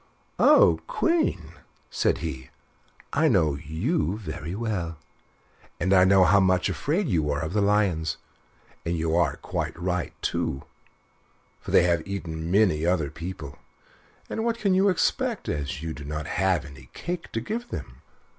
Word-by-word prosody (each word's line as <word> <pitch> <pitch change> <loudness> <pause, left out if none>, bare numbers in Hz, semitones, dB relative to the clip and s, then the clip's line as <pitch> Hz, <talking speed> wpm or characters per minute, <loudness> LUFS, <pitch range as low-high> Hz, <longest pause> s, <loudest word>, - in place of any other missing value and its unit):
"Oh! - - +6
Queen," 330 - 0 0.4
said - - +1
he, 65 -5 -6 0.6
"I 160 +3 +3
know 85 - +3
you 90 - -1
very 85 -3 -6
well, 100 -8 -3 0.8
and 95 +4 +2
I 95 -1 +6
know 95 0 +6
how 100 +2 +5
much 95 -1 +2
afraid 165 +7 -1
you 80 - +1
are 70 0 -1
of 80 +2 -4
the 105 - +2
lions; 100 -6 +1 0.7
and 85 0 -1
you 80 0 0
are 85 -5 +2
quite - - -4
right 90 -1 -2
too, 65 - -1 1.0
for - - -10
they - - +5
have 85 -2 +2
eaten 85 -4 -4
many 90 -5 +3
other 85 -4 +1
people: 85 -5 -7 0.7
and 220 - -3
what 230 0 0
can 205 -4 +1
you 190 +2 +4
expect, 180 - 0
as 75 +1 -3
you 80 - -3
have 75 -2 -7
not 75 +1 -4
any 75 -9 -1
cake 175 0 -5
to 115 - 0
give 230 - -4
them?" - - -7
90 Hz, 155 wpm, -26 LUFS, 80-105 Hz, 1.0 s, Oh